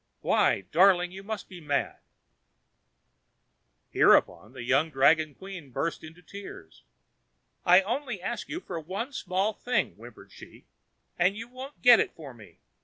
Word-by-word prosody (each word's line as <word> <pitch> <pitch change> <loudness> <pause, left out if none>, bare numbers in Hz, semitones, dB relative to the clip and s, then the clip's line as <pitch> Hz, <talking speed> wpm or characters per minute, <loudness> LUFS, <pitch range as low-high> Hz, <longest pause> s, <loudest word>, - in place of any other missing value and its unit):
Why! - - +2
darling, 180 +1 +4
you 190 +1 -9
must 210 +1 -6
be 180 -2 -11
mad." 145 -2 -2 1.9
Hereupon 110 +4 +3
the 125 - -8
young 135 +6 +2
dragon 155 +1 +3
queen 190 -7 -10
burst 165 +7 -3
into 165 +3 -13
tears. 175 - -11 0.8
"I 180 +2 +7
only 240 +1 -3
ask 235 +6 -5
you 345 - -5
for 175 - -6
one 195 - -5
small 195 0 -1
thing," 250 +4 -1
whimpered - - -14
she, - - -15 0.5
"and 185 +4 +2
you 230 +1 -7
won't 260 +3 -11
get 245 -2 +8
it - - -1
for 145 -5 -10
me. 110 -4 -16
180 Hz, 145 wpm, -27 LUFS, 155-210 Hz, 1.9 s, get